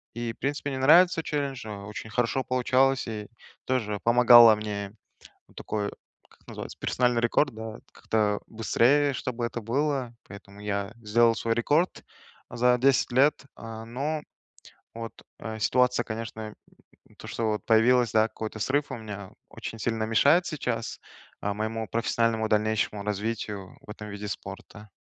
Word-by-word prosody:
и, 120 -1 -3
в - - -27
принципе, 145 +1 -2
мне 130 - -3
нравится 165 +5 +6
челлендж, 140 -6 -3
э, - - -6 0.2
очень 105 +1 -7
хорошо 125 +3 0
получалось 130 +1 +2
и 105 -2 -5 0.4
тоже 110 -6 -1
помогало 120 -1 +8
мне, 105 -1 -5 0.5
вот - - -25
такой, 105 -1 -3 0.4
как - - -26
называется- - - -8
персональный 125 -1 +1
рекорд, 120 +3 +2
да? 110 0 -7
Как-то 105 -2 0
быстрее, 135 +6 +2
чтобы 125 -2 -3
это 120 -1 -5
было, 135 +1 -1
поэтому 100 0 -12
я 100 0 -3
сделал 115 +2 +4
свой 115 0 -1
рекорд 150 +9 +1 0.5
за 125 +1 +3
10 135 +1 +3
лет, 140 +4 +5 0.2
а, 115 0 -8
ну. 145 +6 -3 0.7
Вот, 115 0 -7 0.3
э, 110 -1 -6
ситуация, 125 +2 +2
конечно, 110 -1 -6 0.6
м, - - -22
то, - - -10
что 115 - -2
вот 105 -2 -3
появилась, 120 +1 +4
да, 110 0 +4
какой-то 110 0 -6
срыв 140 +4 0
у - - -4
меня, 105 -3 -8 0.2
очень 115 - -7
сильно 110 0 -1
мешает 140 +10 +4
сейчас, 125 -7 -3 0.4
а, 100 - -1
моему 110 +2 -3
профессиональному 115 -1 0
дальнейшему 105 -1 0
развитию 105 -1 -4
в - - -20
этом 105 0 -8
виде 105 0 -6
спорта. 105 +2 -8
115 Hz, 150 wpm, -27 LUFS, 110-125 Hz, 0.7 s, помогало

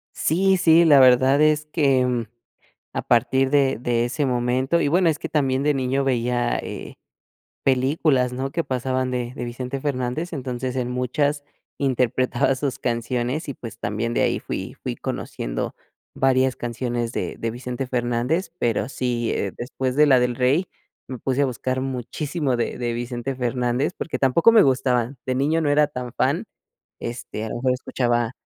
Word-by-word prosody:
Sí 190 +4 +2
sí, 170 -1 +5
la 145 -4 +7
verdad 130 +2 +6
es 155 0 +3
que, 140 -5 +2
mm, 125 -2 0 0.7
a - - -1
partir 130 +3 +2
de 140 -1 +3
de 120 -1 +1
ese 140 +4 -1
momento, 130 +5 +1
y - - +1
bueno, 175 +3 +3
es 155 -2 -1
que - - -5
también 135 -3 +1
de 150 0 +3
niño 135 0 0
veía, 120 -2 0
eh, - - -7 0.7
películas, 130 0 +2
¿no?, 130 +2 -3
que 170 +3 -2
pasaban 130 0 -1
de 125 -1 -3
de 125 - -5
Vicente 125 +3 -5
Fernández, 140 +4 -2
entonces, 130 -3 -4
en 125 -1 -1
muchas 140 +4 0 0.4
interpretaba 130 -1 +1
sus 135 -1 -2
canciones 120 +4 -2
y 140 - -3
pues 115 -2 -9
también 115 +3 -2
de - - 0
ahí - - +1
fui - - -5
fui - - -3
conociendo - - -4 0.4
varias 130 0 +2
canciones 120 0 -3
de - - -3
de 115 - -2
Vicente 125 +2 -5
Fernández 125 +8 -1
pero 115 - 0
sí, 120 -3 -1
eh, 100 - -2
después 130 +1 -3
de 150 - +6
la 135 -3 +6
de 125 - +3
El 120 - -4
Rey 135 +8 +2 0.4
me 130 - -6
puse 130 +3 -1
a 140 - +4
buscar 130 +1 -2
muchísimo 135 +3 -2
de 120 - -2
de 120 -1 -1
Vicente 120 +2 -4
Fernández, 125 +3 -1
porque 165 - -4
tampoco 150 - +4
me 220 -2 +7
gustaba, 130 -2 +1
de 130 - -1
niño 145 +5 +1
no 145 - +1
era 150 +1 +4
tan 125 -4 -6
fan, - - 0 0.6
este, 115 -2 -5
a - - -5
lo - - -4
mejor 130 +1 +1
escuchaba 120 -2 0
130 Hz, 175 wpm, -23 LUFS, 120-140 Hz, 0.7 s, la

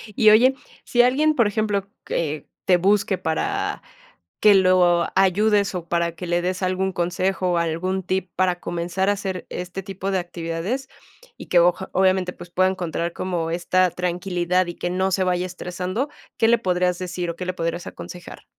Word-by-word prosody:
Y 215 - +6
oye, 250 +5 +6 0.3
sí 240 - +3
alguien, 295 +5 +3
por 235 -4 +4
ejemplo, 205 -1 -1 0.2
que 155 -3 -3 0.2
te 180 - +5
busque 195 +1 +2
para 160 -4 -2 0.6
que 210 -1 +7
lo 180 -2 +4
ayudes, 200 +1 +3
o 170 -2 -5
para 170 0 0
que 180 +2 -7
le 175 0 0
des 185 +1 -2
algún 185 +1 0
consejo, 180 +1 0
algún 170 +3 -1
tip 185 0 -2
para 180 -1 +1
comenzar 175 +3 -2
a - - +5
hacer 190 -2 -4
este 180 +2 -5
tipo 195 +1 -4
de 190 - +1
actividades, 175 +9 -4 0.5
y - - -9
que 175 - +4
oja 180 +2 +2
obviamente, 185 -1 +2
pues, 175 - -12
pueda 185 +2 +3
encontrar 175 -2 -3
como 175 -3 -2
esta 180 +2 +2
tranquilidad 180 0 0
y 175 - -5
que 175 - -3
no 185 +1 0
se 185 0 +2
vaya 180 0 0
estresando, 185 +8 -4 0.3
¿qué 225 - +3
le 235 0 +5
podrías 180 -3 0
decir, 180 -1 -3
o, 170 - -6
qué 180 - -5
le 185 - -2
podrías 170 0 -3
aconsejar? 180 0 -9
185 Hz, 180 wpm, -23 LUFS, 175-195 Hz, 0.6 s, que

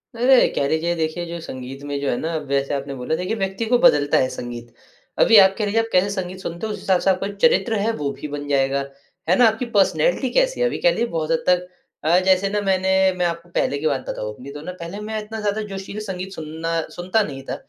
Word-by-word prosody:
अरे! 250 +2 +5
कह 140 - +1
लीजिए, 165 +2 0
देखिए 165 +1 -2
जो 170 0 -6
संगीत 130 -1 -8
में 145 -1 -3
जो 140 - -1
है 120 - 0
ना 165 0 -3
वैसे 140 +1 0
आपने 140 0 -3
बोला, 125 +5 -2
देखिए 180 +6 -2
व्यक्ति 195 +2 -2
को 245 +2 +3
बदलता 145 - +4
है 130 - +3
संगीत। 120 -1 -7 0.5
अभी 225 - +7
आप 190 0 +7
कह 215 - 0
लीजिए, 210 +2 +1
आप 225 - -4
कैसे 185 +2 +3
संगीत 185 -2 -4
सुनते 175 +3 -5
हो - - -4
जिस - - -8
हिसाब 185 -2 +2
से - - +2
आपका 190 +1 +1
चरित्र 240 -1 +3
है 220 +3 +1
वो 145 -5 -2
भी - - -5
बन 145 0 -6
जाएगा। 140 0 +1 0.5
है 180 - +5
ना? 245 - +7
आपकी 220 +3 0
पर्सनैलिटी 210 - +2
कैसी - - +2
है - - +4
अभी - - -3
कह - - +8
लीजिए 235 - 0
बहुत 165 -6 -3
हद 160 - +1
तक 180 0 +2 0.4
अ, 170 +3 +4
जैसे 190 +1 +3
ना 210 - 0
मैंने 190 -1 +1 0.3
मैं 180 - +1
आपको 170 0 -3
पहले 140 - 0
की 155 - 0
बात 135 -3 -1
बताऊँ 105 0 -4
अपनी 130 +6 -10
तो 145 +1 -8
ना 180 - -6
पहले 170 +5 -6
मैं 220 0 -2
इतना 220 +1 -7
ज़्यादा 210 +1 -1
जोशीला 195 +2 -6
संगीत 190 -1 -5
सुनना 160 0 -3 0.2
सुनता 185 +5 +1
नहीं 135 -6 -6
था। - - -4
180 Hz, 250 wpm, -22 LUFS, 145-205 Hz, 0.5 s, कह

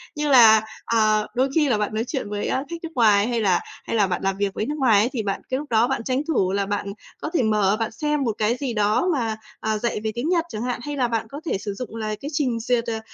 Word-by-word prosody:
Như 300 0 -1
là, 225 -5 +8 0.2
ờ, 215 -2 +2
đôi 260 +2 +2
khi 300 -4 +3
là 225 - +2
bạn 210 0 -2
nói 220 +1 0
chuyện 260 -8 -3
với, 205 0 -3
ơ, 265 - -1
khách 340 - -4
nước 330 - -4
ngoài 210 -3 +4
hay 235 -2 0
là 190 -4 +3 0.2
hay - - -3
là 205 -3 +3
bạn 180 - -2
làm 195 0 0
việc 200 -1 -1
với 215 - -2
nước 295 - -3
ngoài 230 -8 +4
ấy, 230 +4 +2
thì 225 -5 -2
bạn 195 -1 -2
cái 260 - 0
lúc 295 +1 -7
đó 230 +1 +3
bạn 265 -3 -2
tranh 260 +3 0
thủ 190 - +1
là 200 0 0
bạn 205 +1 -2 0.4
có - - -3
thể 295 - +2
mở, 210 -2 +2
bạn 225 - -1
xem 295 +4 -1
một 230 - +1
cái 215 +2 +1
gì 260 -4 -3
đó 210 - +2
mà, 225 -6 -1 0.2
à, 220 0 -1
dạy 235 0 -2
về 220 - -1
tiếng 245 +7 -2
Nhật 345 -2 +2
chẳng 215 - -5
hạn. 245 -1 -2
Hay 290 0 -4
là 250 -2 +2
bạn 225 -1 -2
có 285 +4 -8
thể 250 - 0
sử 200 +1 -5
dụng 230 +1 -7
là 215 -1 -3
cái 285 - -5
trình 255 -6 0
duyệt, 235 0 +1
ờ, 225 -1 -2
230 Hz, 290 wpm, -23 LUFS, 210-265 Hz, 0.4 s, là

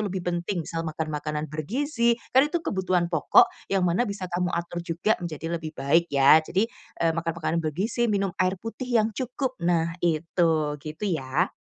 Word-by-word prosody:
lebih 190 -1 -4
penting, 175 0 -2
misal 165 +1 -3
makan 155 0 -4
makanan 150 0 -3
bergizi, 235 - 0 0.2
kan 270 +3 +5
itu 335 0 -2
kebutuhan 180 -3 0
pokok, 160 - +6 0.2
yang 190 -2 +1
mana 180 +8 +1
bisa 200 -2 -4
kamu 180 0 0
atur 175 0 -3
juga 170 +5 0
menjadi 165 -1 -5
lebih 155 -1 -7
baik 160 +6 +2
ya. 140 +3 +6
Jadi, 185 +6 0 0.4
eee, 165 - +3
makan 165 0 -2
makanan 165 0 -1
bergizi, 200 +10 -1
minum 195 -3 0
air 185 +1 +2
putih 225 +5 -7
yang 225 -2 +2
cukup, 255 +3 -3
nah 170 -1 +1
itu. 160 -2 +1
Gitu, 155 +7 -6
ya. 145 +4 0
175 Hz, 175 wpm, -26 LUFS, 160-200 Hz, 0.4 s, pokok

